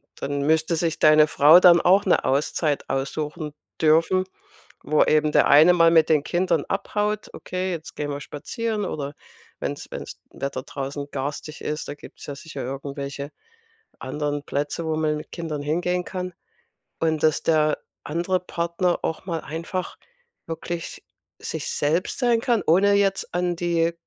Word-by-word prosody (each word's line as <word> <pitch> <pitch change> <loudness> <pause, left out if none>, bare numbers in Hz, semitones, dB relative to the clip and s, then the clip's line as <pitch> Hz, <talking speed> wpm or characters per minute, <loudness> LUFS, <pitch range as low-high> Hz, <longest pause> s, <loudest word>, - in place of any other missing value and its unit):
dann 140 0 -3
müsste 160 +2 +2
sich 165 0 -1
deine 155 0 +6
Frau 150 +3 +7
dann 175 -2 +7
auch 195 +3 +4
'ne 185 - +3
Auszeit 145 +2 0
aussuchen 150 +3 -3 0.3
dürfen, 165 +4 +3 0.6
wo 155 0 +3
eben 155 0 +2
der - - +4
eine 155 +5 +7
mal 165 -1 +5
mit 160 -1 +5
den 155 -3 +3
Kindern 175 -2 +1
abhaut: 210 +2 -2
„Okay, 185 0 -4
jetzt 165 -2 -6
gehen 145 -1 -3
wir 145 0 -5
spazieren“ 215 +9 -3
oder 145 -1 -4 0.5
wenn's - - -4
wenn's - - -8
Wetter 140 -2 -4
draußen 140 0 -5
garstig 145 +3 -5
ist, 150 0 -3
da - - -5
gibt's - - -13
ja 145 - -5
sicher 140 -1 -8
irgendwelche 140 +2 -5 0.7
anderen 145 +2 -3
Plätze, 145 +4 -3
wo 160 - -1
man 155 -1 0
mit - - -10
Kindern 160 -4 -4
hingehen 175 +4 -1
kann. 185 -1 -5 0.7
Und, 160 -2 0
dass 155 -1 +2
der 155 -2 +2 0.3
andere 175 +4 -1
Partner 175 0 -1
auch 160 - -3
mal 170 -3 -2
einfach 170 +4 -5 0.5
wirklich 165 +1 -5 0.4
sich - - -4
selbst 160 +5 0
sein 240 -3 +2
kann, 235 -3 +1
ohne 195 +5 +4
jetzt 195 -1 +1
an 175 0 0
die 170 -1 +1
160 Hz, 155 wpm, -24 LUFS, 145-180 Hz, 0.7 s, Frau